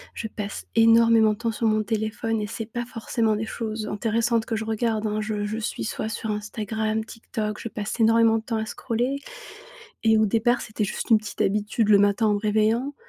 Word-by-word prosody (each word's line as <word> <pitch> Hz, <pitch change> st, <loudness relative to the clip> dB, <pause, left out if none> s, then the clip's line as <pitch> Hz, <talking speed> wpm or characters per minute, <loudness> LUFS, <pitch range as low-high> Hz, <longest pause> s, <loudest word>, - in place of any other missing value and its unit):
je 220 Hz, -, -4 dB
passe 210 Hz, -1 st, -6 dB
énormément 230 Hz, -1 st, +6 dB
de 210 Hz, -, -9 dB
temps 230 Hz, 0 st, -1 dB
sur 225 Hz, +1 st, -1 dB
mon 215 Hz, 0 st, +2 dB
téléphone 220 Hz, +1 st, -2 dB
et 210 Hz, -, -3 dB
c'est 225 Hz, +2 st, -5 dB
pas 240 Hz, +2 st, -5 dB
forcément 225 Hz, -2 st, -1 dB
des 220 Hz, -, -2 dB
choses 220 Hz, -1 st, -4 dB
intéressantes 230 Hz, +2 st, 0 dB
que 225 Hz, -, -2 dB
je 220 Hz, -, -4 dB
regarde, 220 Hz, -1 st, -1 dB
hein. 215 Hz, 0 st, -1 dB
Je 210 Hz, -1 st, -2 dB
je 215 Hz, +2 st, -3 dB
suis 220 Hz, -, -3 dB
soit 220 Hz, -, -3 dB
sur 220 Hz, 0 st, -3 dB
Instagram, 215 Hz, +1 st, -2 dB
TikTok, 215 Hz, -2 st, -5 dB
je 230 Hz, -, -5 dB
passe 210 Hz, +3 st, -5 dB
énormément 225 Hz, 0 st, +5 dB
de -, -, -12 dB
temps 225 Hz, 0 st, -2 dB
à 220 Hz, -, -2 dB
scroller. 245 Hz, +4 st, -2 dB, 0.9 s
Et 220 Hz, -1 st, +4 dB
au 215 Hz, -, +4 dB
départ, 230 Hz, +4 st, +2 dB
c'était 215 Hz, 0 st, -3 dB
juste 200 Hz, -, -4 dB
une 225 Hz, -, +7 dB
petite 215 Hz, -1 st, -9 dB
habitude 210 Hz, +2 st, +1 dB
le 205 Hz, -1 st, +7 dB
matin 205 Hz, +2 st, +3 dB
en 210 Hz, -, +3 dB
me -, -, 0 dB
réveillant. 220 Hz, +6 st, +1 dB
220 Hz, 210 wpm, -24 LUFS, 215-230 Hz, 0.9 s, une